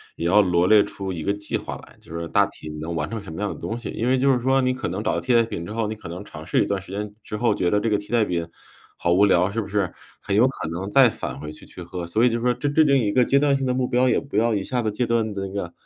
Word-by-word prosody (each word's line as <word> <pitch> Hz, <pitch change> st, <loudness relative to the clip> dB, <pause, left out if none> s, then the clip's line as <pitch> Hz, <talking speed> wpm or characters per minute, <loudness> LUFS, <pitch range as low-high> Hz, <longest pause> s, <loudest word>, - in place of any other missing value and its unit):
也 85 Hz, -, -4 dB
要 100 Hz, +5 st, +5 dB
罗 90 Hz, -2 st, +2 dB
列 105 Hz, +2 st, +6 dB
出 95 Hz, -2 st, -5 dB
一 80 Hz, -, -5 dB
个 100 Hz, -, 0 dB
计 105 Hz, 0 st, -5 dB
划 -, -, -4 dB
来， -, -, -19 dB
就 85 Hz, -, -9 dB
是 85 Hz, -, -4 dB
大 -, -, +4 dB
体 -, -, -12 dB
能 85 Hz, +1 st, -4 dB
完 75 Hz, -1 st, -1 dB
成 110 Hz, +2 st, -5 dB
什 80 Hz, -, -9 dB
么 80 Hz, -, -7 dB
样 105 Hz, -1 st, -2 dB
的 -, -, -11 dB
东 115 Hz, -, -4 dB
西， 120 Hz, -, -6 dB
因 115 Hz, -, -2 dB
为 130 Hz, +1 st, +3 dB
就 135 Hz, +1 st, +3 dB
是 125 Hz, -, +1 dB
说， 130 Hz, +2 st, +2 dB
你 130 Hz, -1 st, +2 dB
可 130 Hz, -, -4 dB
能 95 Hz, +5 st, -3 dB
找 -, -, 0 dB
到 -, -, 0 dB
替 125 Hz, -2 st, +1 dB
代 115 Hz, -, +6 dB
品 100 Hz, -6 st, -5 dB
之 85 Hz, -, -7 dB
后， 115 Hz, 0 st, -1 dB
你 110 Hz, -, -3 dB
可 110 Hz, -5 st, -10 dB
能 90 Hz, +4 st, -7 dB
尝 80 Hz, -5 st, -10 dB
试 85 Hz, -, +2 dB
一 -, -, -2 dB
段 100 Hz, -2 st, -2 dB
时 95 Hz, -, -12 dB
间 105 Hz, +1 st, -4 dB
之 105 Hz, -, -5 dB
后， 115 Hz, -1 st, +2 dB
觉 90 Hz, -3 st, 0 dB
得 105 Hz, -, +2 dB
这 110 Hz, +1 st, -1 dB
个 -, -, +4 dB
替 105 Hz, +2 st, -10 dB
代 115 Hz, -2 st, +3 dB
品 85 Hz, -3 st, -2 dB, 0.5 s
好 85 Hz, -, +1 dB
无 95 Hz, +3 st, +4 dB
聊， 90 Hz, 0 st, +3 dB
是 115 Hz, +2 st, -1 dB
不 100 Hz, -, -7 dB
是？ 100 Hz, -2 st, -1 dB, 0.3 s
很 100 Hz, -, -2 dB
有 120 Hz, +5 st, +5 dB
可 130 Hz, -11 st, -5 dB
能 90 Hz, +4 st, -4 dB
再 130 Hz, +3 st, +6 dB
返 65 Hz, +2 st, -6 dB
回 75 Hz, +1 st, -7 dB
去 75 Hz, -, -14 dB
去 90 Hz, -, -10 dB
喝， 85 Hz, 0 st, -6 dB
所 110 Hz, +7 st, +1 dB
以 125 Hz, -, +5 dB
就 115 Hz, 0 st, -1 dB
说 125 Hz, -, +2 dB
这 145 Hz, -, -2 dB
制 155 Hz, +2 st, +4 dB
定 140 Hz, -2 st, +4 dB
一 105 Hz, -5 st, +1 dB
个 125 Hz, +2 st, +4 dB
阶 140 Hz, -, +3 dB
段 140 Hz, -1 st, +3 dB
性 135 Hz, -1 st, -1 dB
的 125 Hz, -, +1 dB
目 125 Hz, -1 st, 0 dB
标， 125 Hz, 0 st, +2 dB
也 -, -, +3 dB
不 140 Hz, -7 st, -10 dB
要 115 Hz, 0 st, +3 dB
一 100 Hz, -, -1 dB
下 125 Hz, +4 st, -1 dB
子 110 Hz, -, 0 dB
戒 120 Hz, +4 st, -1 dB
断 115 Hz, -2 st, 0 dB
地 100 Hz, -1 st, -4 dB
那 95 Hz, -, -7 dB
个 90 Hz, -4 st, -4 dB
105 Hz, 370 characters per minute, -23 LUFS, 90-120 Hz, 0.5 s, 列